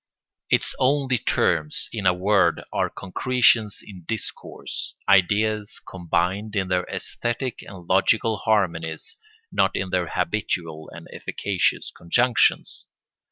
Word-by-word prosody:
Its - - +1
only 130 -2 +2
terms, 75 -6 0
in 105 -4 -1
a 90 - +5
word, 95 -2 +2
are - - +1
concretions 115 +1 +2
in 95 -4 -11
discourse, 115 -3 -5
ideas 105 +3 +2
combined 95 +4 -1
in 95 -2 0
their 90 -1 +1
æsthetic 120 +1 -3
and 95 -3 -11
logical 110 +4 +3
harmonies, 95 - -1 0.4
not - - +2
in 95 -1 -2
their 90 -2 0
habitual 85 -3 -2
and - - -11
efficacious 95 -3 -1
conjunctions. 120 +8 +1
100 Hz, 115 wpm, -24 LUFS, 90-110 Hz, 0.4 s, a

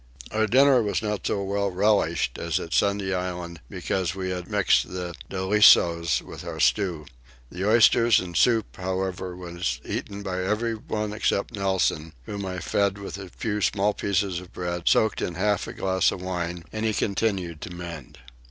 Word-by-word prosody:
Our 110 0 +1
dinner 130 +2 +5
was 105 0 -1
not 105 -1 -2
so 100 - -1
well 100 +1 0
relished 95 -3 +1
as 85 +1 -1
at 85 -2 -6
Sunday 100 -1 +1
Island 90 -2 -4
because 90 -1 -2
we 95 -1 -3
had 90 -1 -5
mixed 100 -3 +2
the 90 -1 -4 0.2
dolichos 95 -4 +4
with - - -10
our - - -6
stew. 90 -7 +1 0.5
The 95 +4 -1
oysters 115 0 +5
and 90 -2 -6
soup 115 0 +2
however 95 -1 -3
were 85 -1 -9 0.3
eaten 100 0 -5
by 95 -2 -2
everyone 105 0 -2
except 105 0 0
Nelson 95 -5 0
whom 100 +5 -5
I 95 0 -4
fed 100 +1 0
with 100 0 -7
a 95 -2 -8
few 105 +3 -3
small 100 +1 +2
pieces 100 -3 -1
of 90 -1 -13
bread 85 -1 -4
soaked 110 - +2
in 85 - -3
half 105 +2 0
a - - -6
glass 95 -1 +1
of - - -5
wine, 90 -2 -4
and 110 0 -3
he 110 -2 +1
continued 95 -6 -1
to - - -6
mend. 85 -6 -8
95 Hz, 170 wpm, -25 LUFS, 90-105 Hz, 0.5 s, dinner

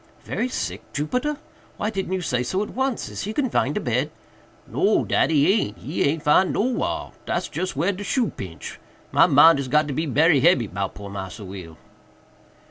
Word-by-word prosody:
"Very 250 - -2
sick, - - -3
Jupiter!—why 250 - -4
didn't 190 -3 -3
you 190 - -1
say 125 -6 0
so 185 +11 -1
at - - -7
once? 265 -1 -1
Is - - -6
he 210 +3 -4
confined 260 0 0
to - - -1
bed?" - - 0 0.6
"No, - - +1
dat - - +2
he 155 +4 +4
aint!—he 115 - -4
aint 150 +2 0
'fin'd 180 +5 +4
nowhar—dat's 245 +4 -2
just 185 -5 -3
whar 170 +8 +1
de 200 +1 -6
shoe 225 +4 0
pinch—my 90 - -2
mind 160 0 +7
is 135 - -3
got 150 +3 +2
to 145 - -3
be 160 +4 -1
berry 150 +2 +4
hebby 140 -4 +4
'bout 95 0 -4
poor 100 -1 -8
Massa 100 +1 -7
Will." 90 -4 -9
155 Hz, 175 wpm, -23 LUFS, 125-200 Hz, 0.6 s, mind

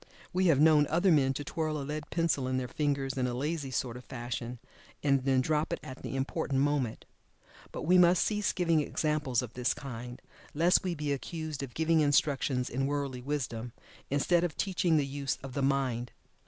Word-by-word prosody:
We 185 0 +2
have 150 -5 +4
known 150 -1 +6
other 175 +4 +3
men 140 -4 +4
to 145 - -3
twirl 155 0 -2
a - - -4
lead 150 +1 -5
pencil 165 -6 0
in 130 0 0
their 130 -1 -2
fingers 140 -2 -1
in 125 - +1
a 120 - -3
lazy 145 +1 -2
sort 125 -1 -2
of 125 - -11
fashion, 120 -1 -5 0.5
and 140 -2 +2
then 135 -1 +3
drop 150 +3 0
it - - -2
at 130 - -9
the - - -5
important 135 0 -1
moment. 140 -5 0 0.7
But - - -6
we 180 +3 +5
must 175 0 +5
cease 210 -2 0
giving 170 -4 +2
examples 150 -5 0
of 120 -2 -8
this 125 0 0
kind, 125 -2 -7 0.4
lest 170 +4 +4
we 180 -2 -1
be 150 -2 -1
accused 155 +1 -5
of 135 -3 -7
giving 160 0 +3
instructions 140 -3 +2
in 135 +2 -1
worldly 140 -3 -2
wisdom, 125 -4 -3 0.4
instead 170 +5 +2
of 175 -4 -2
teaching 180 -4 +1
the 145 - +2
use 140 0 -3
of 135 -2 -7
the 140 - -1
mind. 130 -3 0
140 Hz, 195 wpm, -30 LUFS, 130-160 Hz, 0.7 s, known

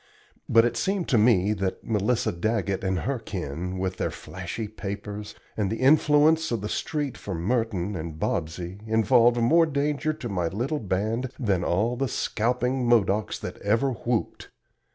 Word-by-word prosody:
But 115 0 +6
it 120 - 0
seemed 195 -2 -1
to 120 - +4
me 105 -3 +4
that 95 -2 -3
Melissa 110 +2 0
Daggett 100 +1 -1
and 95 -3 0
her 135 -2 -2
kin 90 -2 -5
with 95 -1 -2
their - - -1
flashy 95 +4 -6
papers, 105 0 -6 0.2
and 105 -3 0
the 110 - -1
influence 150 +3 +4
of 115 -4 -1
the 105 - -4
street 145 -5 -3
for 95 - -5
Merton 105 0 -1
and 80 -2 -5
Bobsey, 85 +4 -3
involved 115 +2 +4
more 160 +8 +4
danger 150 +1 0
to 140 -5 -6
my 90 -5 -1
little 125 - -2
band 110 +5 -1
than 100 -8 0
all 105 +9 +1
the 135 +2 -1
scalping 125 +3 0
Modocs 105 -3 +2
that - - -6
ever 115 +7 +1
whooped. 120 -1 -3
110 Hz, 160 wpm, -26 LUFS, 95-125 Hz, 0.2 s, But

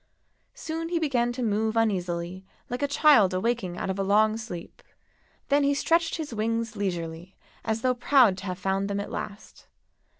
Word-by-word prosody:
Soon 330 +1 -4
he 345 - 0
began 255 -7 +1
to 250 0 -4
move 220 +1 0
uneasily, 180 -4 -1 0.3
like 245 - -3
a 285 - +2
child 275 - +5
awaking 190 -3 -1
out - - -2
of 190 - -5
a - - +1
long 215 +2 +3
sleep; 215 -7 -8 0.7
then 285 0 +3
he 280 0 +2
stretched 330 +3 +1
his 310 -6 -5
wings 230 +1 -2
leisurely 175 -2 -4 0.3
as 220 0 -2
though 255 -1 +3
proud 245 -4 +4
to 190 - -9
have 180 -1 -3
found 195 +1 -1
them 200 0 -1
at 200 - -5
last. 205 0 -8
220 Hz, 175 wpm, -26 LUFS, 190-255 Hz, 0.7 s, child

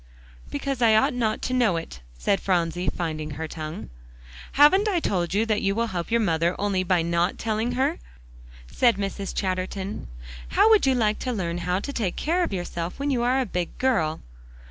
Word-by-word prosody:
"Because 275 -3 -3
I 225 -2 +5
ought 220 - +3
not 225 -3 -1
to 255 - -1
know 235 -9 +3
it," 165 - -7 0.2
said 195 - +1
Phronsie, 175 -1 0
finding 155 -3 -4
her 160 +1 -3
tongue. 155 - -7 0.6
"Haven't 370 +9 +6
I 380 -4 +2
told 180 - -1
you 215 +2 +2
that 215 -2 0
you 195 0 +1
will 230 +1 +1
help 175 -2 -3
your 235 0 +2
mother 170 -3 +1
only 200 -2 0
by 180 -2 +2
not 170 +2 0
telling 225 +2 -1
her?" 260 +2 0 0.7
said 230 - +2
Mrs. 200 0 -3
Chatterton. 190 - -3 0.4
"How 445 - +4
would 425 -10 +5
you 265 - +4
like 215 -3 +1
to 255 - -2
learn 175 -6 -2
how 180 +2 0
to 280 - -5
take 205 -9 -1
care 340 +4 0
of - - -2
yourself 175 -2 -4
when 280 +1 -1
you 250 -3 +1
are 250 +2 +2
a 260 - +1
big 180 -5 -4
girl?" 185 -12 +1
200 Hz, 195 wpm, -25 LUFS, 175-245 Hz, 0.7 s, Haven't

